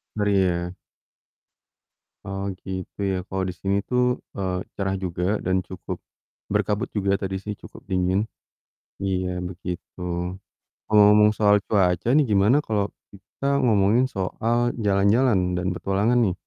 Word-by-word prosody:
Ngeri 105 -1 +1
ya. 90 -1 0 1.5
Oh, 95 0 -4 0.2
gitu 95 0 -6
ya, 95 - 0
kalo 95 0 -2
di - - -4
sini 100 0 0
tuh, 125 0 +2 0.4
eee, 95 -2 -1 0.2
cerah 95 -1 -1
juga 90 -1 -3 0.2
dan 95 +1 +2
cukup 95 - -6 0.6
berkabut 105 0 0
juga 100 -1 +1
tadi 95 -1 -2
sih 105 - -3
cukup - - -12
dingin. 95 0 +1 0.8
Iya, 95 -1 0 0.2
begitu. 90 0 -7 0.9
Ngomong-ngomong 105 0 +6
soal 105 -1 +5
cuaca 95 -2 +2
nih 150 -1 +5
gimana 105 +6 +4
kalo 105 -2 0 0.3
kita 100 +7 -11 0.2
ngomongin 110 +2 +4
soal 110 +5 -1 0.3
jalan-jalan 100 +4 +4 0.2
dan 90 +1 -1
petualangan 100 +6 +1
nih. 95 - +1
100 Hz, 130 wpm, -24 LUFS, 95-105 Hz, 1.5 s, Ngomong-ngomong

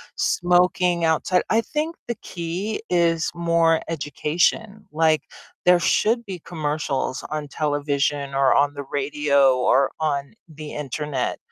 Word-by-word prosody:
smoking 180 -1 +2
outside, 165 +3 +2
I 225 - +4
think 310 +6 -3
the 235 - -2
key 180 +5 -4
is 170 -2 +2
more 170 -1 +2
education. 165 +7 -1
Like, 160 0 +2 0.4
there 180 -1 +6
should 230 +7 +1
be 190 -4 -6
commercials 150 -4 -3
on 150 -1 -4
television, 145 -1 -1
or 135 -1 +3
on 145 0 +3
the 145 - -6
radio, 140 -2 +2
or 135 +2 +3
on 140 -3 -2
the 155 -1 -9
Internet, 145 -2 -3
155 Hz, 125 wpm, -23 LUFS, 145-175 Hz, 0.4 s, there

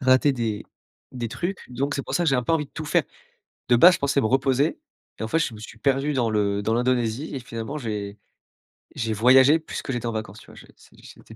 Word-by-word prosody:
rater 130 +2 +4
des 115 -5 -3 0.5
des 120 -3 -4
trucs, 175 - -4
donc 140 +3 -2
c'est 140 - -2
pour - - -5
ça 175 - +1
que 165 - +3
j'ai 135 - +3
un 125 - 0
peu 140 - -1
envie 155 -3 +1
de - - -32
tout 160 - -5
faire. 145 - +2 0.6
De 120 - +5
base, 175 +9 +8
je - - -3
pensais 140 0 +1
me - - +1
reposer 135 +4 +1 0.4
et - - -6
en 110 - -3
fait, 165 - +1
je 165 -8 -1
me 105 - -11
suis 110 +1 -11
perdu 135 +3 +1
dans 120 -4 +1
le 100 -1 0
dans 110 +2 0
l'Indonésie 125 +2 0
et - - -2
finalement 120 +4 -6
j'ai 105 -4 -5 0.8
j'ai 115 -2 -2
voyagé 130 +7 +6
plus 155 - -6
que - - -5
j'étais 120 -2 -3
en 115 - -1
vacances, 110 -2 -6
tu - - -17
vois, - - -15
je - - -13
c'é - - -21
c'était - - -14
125 Hz, 255 wpm, -24 LUFS, 110-140 Hz, 0.8 s, base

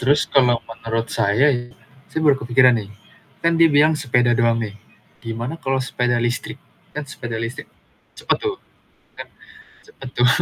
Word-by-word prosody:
Terus 140 +4 +3
kalau 125 -4 +3
menurut 115 0 -4
saya 115 +6 +3
ya, 120 -1 -4 0.4
saya 160 - -3
baru 145 -2 +5
kepikiran, 125 +2 +4
nih, 100 - -10 0.6
kan 170 0 +3
dia 165 - +7
bilang 150 +2 +4
sepeda 120 -4 +2
doang 115 -1 +2
nih, 105 -2 -5 0.5
gimana 115 +7 -4
kalau 135 0 -1
sepeda 125 -1 -1
listrik, 120 +1 -2 0.4
kan 150 - -3
sepeda 120 -4 -6
listrik 125 +6 -5 0.5
cepat - - 0
tuh, 415 -3 -2 0.6
kan - - -8 0.6
cepet 410 - -11
tuh. 120 - +4
125 Hz, 155 wpm, -21 LUFS, 115-145 Hz, 0.6 s, dia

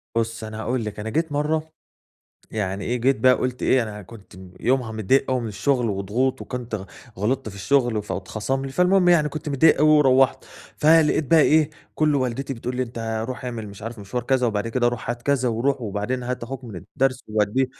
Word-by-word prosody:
بُصي، 115 -1 -2
أنا 110 0 -7
هاقول 120 -1 -2
لِك، 105 0 -6
أنا 110 - -4
جيت 160 +5 -1
مرة، 150 +2 0 0.9
يعني 100 -2 -3
إيه، 120 - -1
جيت 135 +3 +3
بقى 130 +2 +6
قُلت 125 0 -3
إيه 130 - +3
أنا 105 -2 -7
كنت 100 +1 -14 0.3
يومها 125 -3 +1
متضايق 130 +6 +1
أوي 130 - +1
من 115 - -4
الشُّغل 125 +3 0
وضغوط، 105 +7 -1
وكنت 120 -3 -6
غ 95 - -4 0.3
غلِطت 110 +2 -1
في 100 - -10
الشُّغل 115 +2 +1
فاتخصم 110 +7 -3
لي، 135 - -6
فالمُهم 180 +2 +3
يعني 160 -4 +4
كنت 150 0 -6
متضايق 145 +2 +4
أوي 155 +2 +5
ورُوّحت، 135 -3 +4 0.3
فلقيت 155 0 +4
بقى 165 - +7
إيه، 155 0 +4 0.2
كُلُّه 150 -2 +2
والدتي 130 +2 -2
بتقول 125 +2 -5
لي 130 - +1
أنتَ 115 -2 -4
رُوح 130 -1 -6
اعمل 115 -4 -5
مش 100 +1 -12
عارف 115 0 -6
مشوار 105 +5 -4
كذا، 130 0 +1
وبعد 110 0 -1
كده 120 +1 +1
رُوح 120 -1 -4
هات 120 0 -5
كذا، 135 -3 +1
وروح، 130 +4 0
وبعدين 110 +4 -3
هات 125 0 -4
أخوك 130 +2 -6
من 110 -6 -8
الدّرس 130 +8 -2
ووديه، 110 +5 +1
125 Hz, 200 wpm, -23 LUFS, 110-135 Hz, 0.9 s, بقى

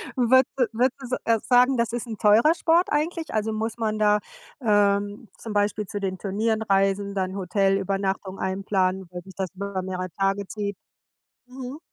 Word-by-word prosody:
würdes 255 +1 +5 0.3
würdest, 255 +1 0
äh, 230 -1 +3
sagen, 250 +1 +5
das 235 0 0
ist 240 0 -3
'n 220 -2 -6
teurer 230 +10 +5
Sport 335 +2 +3
eigentlich? 320 +2 -1
Also, 215 0 0
muss 225 +1 -3
man 215 -1 -1
da, 210 0 +4 0.4
ähm, 205 0 +1
zum 220 -2 -7
Beispiel 205 0 0
zu 205 +2 -5
den 190 -1 -3
Turnieren 220 +3 -1
reisen, 195 0 +1
dann 190 -1 -2
Hotelübernachtungen 195 0 0
einplanen, 190 -1 0
weil 180 0 -6
sich 190 -2 -14
das 190 -2 -3
über 195 0 -4
mehrere 185 -1 -4
Tage 195 0 0
zieht? 205 -2 -4 0.7
Mhm. 255 +2 -8
205 Hz, 160 wpm, -25 LUFS, 195-235 Hz, 0.7 s, würdes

